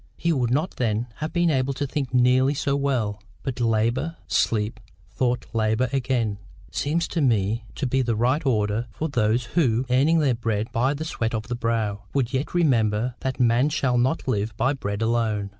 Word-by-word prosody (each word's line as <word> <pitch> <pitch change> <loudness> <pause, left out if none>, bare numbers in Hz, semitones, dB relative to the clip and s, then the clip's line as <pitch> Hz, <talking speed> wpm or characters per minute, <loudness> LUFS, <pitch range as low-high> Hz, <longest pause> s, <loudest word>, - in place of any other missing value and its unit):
He 170 0 +1
would 125 -5 0
not 150 +8 -1
then 115 -1 0
have 155 +1 -4
been 175 -1 +2
able 135 -1 0
to 145 - -2
think 135 -1 -3
nearly 130 +2 +3
so 140 0 0
well. 120 -8 -1 0.2
But 130 -2 -4
LABOUR, 115 +7 +1
SLEEP, 110 0 0 0.3
THOUGHT, 120 +2 0
LABOUR 110 +2 +1
AGAIN, 120 -6 0 0.3
seems 165 +4 0
to 165 - -1
me 110 -3 +1
to 140 - -2
be 130 +1 +1
the 120 -3 0
right 125 +7 +1
order 110 -3 0
with 160 -1 -1
those 115 -1 +2
who, 130 -7 +2
earning 145 +6 +4
their 145 -5 +3
bread 115 -1 -2
by 130 +5 +1
the 155 +3 -4
sweat 115 -7 -2
of 110 +2 -5
the 120 - -1
brow, 115 -4 -1
would 130 -3 0
yet 135 +6 -2
remember 120 -7 +2
that 130 0 -3
man 120 +3 +3
shall 135 -5 +1
not 130 +6 0
live 110 -3 -1
by 130 - +2
bread 100 -5 -3
alone. 110 -3 0
125 Hz, 190 wpm, -24 LUFS, 110-140 Hz, 0.3 s, earning